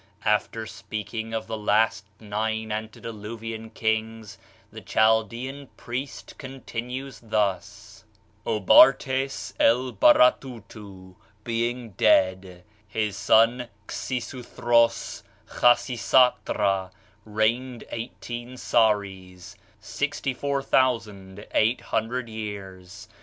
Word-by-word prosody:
After 105 +1 0
speaking 110 +1 -6
of 110 -1 -3
the 110 -1 -5
last 105 -1 +1
nine 110 +1 -3
antediluvian 110 +1 -6
kings, 110 -1 -3 0.3
the - - -10
Chaldean 115 +5 0
priest 130 +4 -6
continues 130 0 -6
thus. 105 -1 -3 0.4
"Obartès 130 +5 +4
Elbaratutu 115 -5 +2 0.3
being 120 0 -2
dead, 95 -1 +2 0.2
his 105 -1 -2
son 115 +4 +3 0.2
Xisuthros 120 -2 -1 0.3
(Khasisatra) 115 -5 +2 0.3
reigned 115 +4 -1
eighteen 120 +1 -7
sares 100 -6 0 0.3
(64,800 120 -3 -1
years). 100 -5 -8
110 Hz, 65 wpm, -25 LUFS, 105-120 Hz, 0.4 s, Obartès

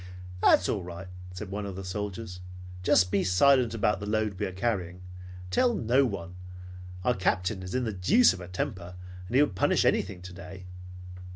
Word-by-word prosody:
"That's - - +5
all - - -1
right," 90 +2 -8 0.2
said 95 +2 -7
one 100 0 -4
of 95 - -6
the 95 - -6
soldiers. 100 0 -5 0.4
"Just 90 0 +3
be 95 - +2
silent 120 +6 +4
about 105 -1 +1
the 105 - -6
load 105 -3 -1
we - - 0
are - - -6
carrying. 90 -3 -2 0.5
Tell 240 - +3
no 130 - +3
one. 90 -5 -6 0.7
Our 125 - +3
Captain 95 0 0
is 95 +4 -6
in 130 - +1
the 110 -2 -2
deuce 100 - +4
of 95 - -8
a 90 - -8
temper. 90 0 -4 0.3
He 125 +4 +3
would 145 - -1
punish 90 - +2
anything 90 -2 0
today." 90 0 -10
95 Hz, 180 wpm, -28 LUFS, 90-110 Hz, 0.7 s, That's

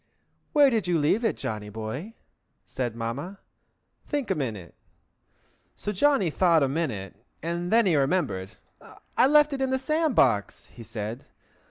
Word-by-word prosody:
"Where 285 -3 +5
did 220 -5 0
you 175 -1 +2
leave 160 +10 +2
it, 225 - 0
Johnny 105 -1 -5
Boy?" 110 - -6 0.5
said 120 -3 -4
Mamma. 130 +12 -5 0.7
"Think 285 -8 -2
a - - +4
minute!" 110 - -5 1.0
So 210 - -4
Johnny 210 - +2
thought 170 -2 +3
a - - +3
minute, 115 - -4 0.2
and 170 +1 -3
then 230 0 +5
he 175 -4 +3
remembered. 135 - 0 0.6
"I - - +5
left 295 0 +5
it 270 - -3
in 265 - +1
the 265 - +1
sand 305 +1 0
box," 105 - +2
he 120 - -12
said. 110 +2 -6
165 Hz, 155 wpm, -26 LUFS, -, 1.0 s, Where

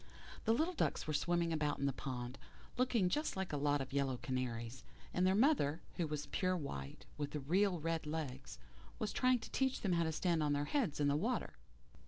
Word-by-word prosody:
The 225 - +4
little 325 +8 +1
ducks - - 0
were 155 - -2
swimming 170 +2 +1
about 150 -2 0
in 140 - -1
the 140 - +1
pond, 125 -1 -5 0.4
looking 245 -6 +3
just 300 - 0
like 190 -4 -2
a - - +1
lot 145 0 +2
of 135 0 -5
yellow 135 -2 +1
canaries, 120 -2 -3 0.3
and 180 +1 +3
their 190 - +4
mother, 210 - +3 0.2
who 170 - +1
was 150 -1 -3
pure 185 +5 0
white 70 - -6
with 145 0 -3
real 185 +1 +3
red 165 0 -1
legs, 150 -4 -4 0.4
was 215 - -2
trying 255 0 +4
to 225 - -9
teach 265 -1 +1
them 190 -4 +1
how 170 -1 +3
to 160 - 0
stand 165 0 +1
on 150 -1 +2
their 145 0 0
heads 225 - 0
in 145 - +3
the 145 - +3
water. 225 +10 0
160 Hz, 210 wpm, -37 LUFS, 140-190 Hz, 0.4 s, The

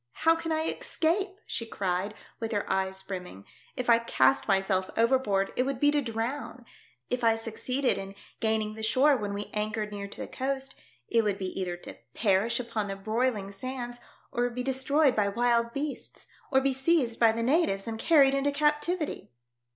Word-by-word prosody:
How 325 0 +7
can 330 0 -4
I 315 0 +1
escape 370 +4 0
?" - - -35
she - - -3
cried, 195 -2 -2 0.2
with 225 -1 -3
her 205 - -1
eyes 190 0 -1
brimming. 180 - -7 0.2
" - - -29
If 250 - -2
I 230 -1 +6
cast 235 +3 +2
myself 195 -2 +1
overboard, 225 -5 +2
it - - +2
would 265 -1 -1
be 290 +1 +4
to 295 -1 +2
drown; 240 +1 -4 0.5
if 250 -1 -1
I 225 -1 +5
succeeded 245 +4 -1
in 195 0 -7 0.2
gaining 220 -1 0
the 220 - -8
shore 265 +6 +4
when 205 -5 -3
we 200 +1 -5
anchored 210 0 -2
near 200 -1 -5
to 200 - -9
the - - -4
coast, 270 0 -3 0.3
it 230 -1 +3
would 205 -2 0
be 190 -2 -3
either 180 -2 -3
to - - -10 0.2
perish 205 +2 +2
upon 230 -4 -3
the 195 - -3
broiling 215 0 -1
sands, 245 +3 -6 0.3
or 245 0 0
be 250 +1 -4
destroyed 270 +2 +2
by 205 -2 +2
wild 235 +2 +2
beasts, 280 +2 -5 0.3
or 265 -1 +4
be 270 0 +1
seized 265 -3 +1
by 230 -1 +6
the 230 +1 -2
natives 245 - +2
and 225 -1 -4
carried 280 -3 +5
into 275 +1 +1
captivity." 300 +3 0
235 Hz, 190 wpm, -28 LUFS, 205-270 Hz, 0.5 s, How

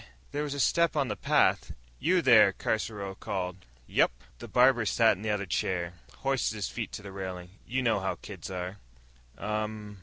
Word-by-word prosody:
There 145 - -2
was 145 -1 -3
a - - -4
step 170 +3 +3
on 140 -4 +1
the 105 - -2
path. - - +2 0.3
"You 180 +2 +2
there?" 110 -6 +7
Caruso 105 -2 -2
called. 95 -1 -4 0.3
"Yep." - - +3 0.3
The - - -8
barber 125 -1 +4
sat 110 +1 +4
in 95 - -12
the 110 - -2
other 105 -1 0
chair, 90 -1 -1 0.3
hoisted 135 -5 +1
his 105 -2 -3
feet 115 -3 -5
to 100 - -6
the 100 - -8
railing. 90 -2 -6 0.2
"You 130 +2 -1
know 115 -4 +2
how 95 0 -2
kids 95 -5 -9
are." 90 +1 -5 0.6
"Um." 105 -1 -4
105 Hz, 185 wpm, -29 LUFS, 95-125 Hz, 0.6 s, there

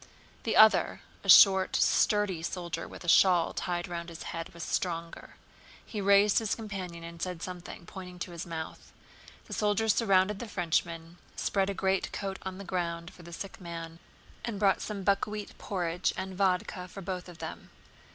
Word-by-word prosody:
The 225 - 0
other, 220 0 +6 0.2
a - - -5
short 190 -2 +8
sturdy 205 -5 +3
soldier 175 0 -4
with - - -10
a - - -9
shawl 175 -1 +5
tied 175 -1 -2
round 170 -1 -5
his 165 0 -8
head, 165 0 -5
was 170 -1 -8
stronger. 170 -1 -3 0.5
He 210 - -5
raised 200 +1 +5
his 220 -3 -1
companion 190 -6 -6
and 170 0 -9
said 180 -2 -3
something, 180 -1 -8
pointing 180 -1 -9
to 175 0 -5
his 170 -1 -6
mouth. 160 -2 -7 0.5
The - - -8
soldiers 210 +1 +2
surrounded 195 -2 +3
the 240 - -5
Frenchmen, 170 -2 -2 0.2
spread 195 -1 0
a 200 - -2
greatcoat 190 0 -1
on 190 0 -6
the 200 - -7
ground 170 -2 -3
for - - -14
the 170 0 -11
sick 195 +5 -7
man, 165 -1 -7 0.4
and 230 -4 -3
brought 200 -2 +3
some 205 -2 -4
buckwheat 205 +1 0
porridge 180 -2 -1
and 190 0 -4
vodka 185 -1 0
for 195 +2 -9
both 180 -1 -4
of 175 - -11
them. - - -7
185 Hz, 170 wpm, -30 LUFS, 170-200 Hz, 0.5 s, short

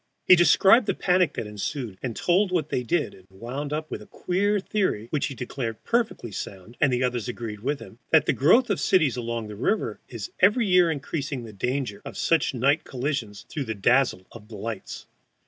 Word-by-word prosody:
He 185 - +9
described 195 +6 +5
the - - +1
panic 180 -2 +2
that - - -3
ensued, 105 0 -5
and 120 -4 -4
told 185 +2 +2
what 160 -5 0
they - - 0
did, 150 +7 -1
and 95 -1 -18
wound 125 +9 -6
up 155 +1 -3
with - - -4
a - - -13
queer 200 +3 0
theory 190 - -1
(which 150 - 0
he 135 - -7
declared 120 -2 -5
perfectly 230 - -1
sound, 95 +3 -7
and 145 -3 +4
the 125 0 +1
others 125 -1 -1
agreed 115 -3 -5
with 140 +6 -2
him) 115 - -13
that 160 - +5
the - - +2
growth 215 - +4
of 200 - 0
cities 160 -9 +3
along 115 -2 -3
the 105 - -8
river 120 - -1
is 115 -4 -7
every 215 +5 +4
year 180 -3 +5
increasing 140 -3 -3
the 110 -2 -10
danger 125 0 -3
of - - -8
such 165 -4 +1
night 140 +6 +2
collisions 125 -6 -4
through 145 -3 -4
the 110 -1 -3
dazzle 120 -1 +2
of 110 -1 -13
lights. 110 0 -6
135 Hz, 200 wpm, -25 LUFS, 115-175 Hz, -, He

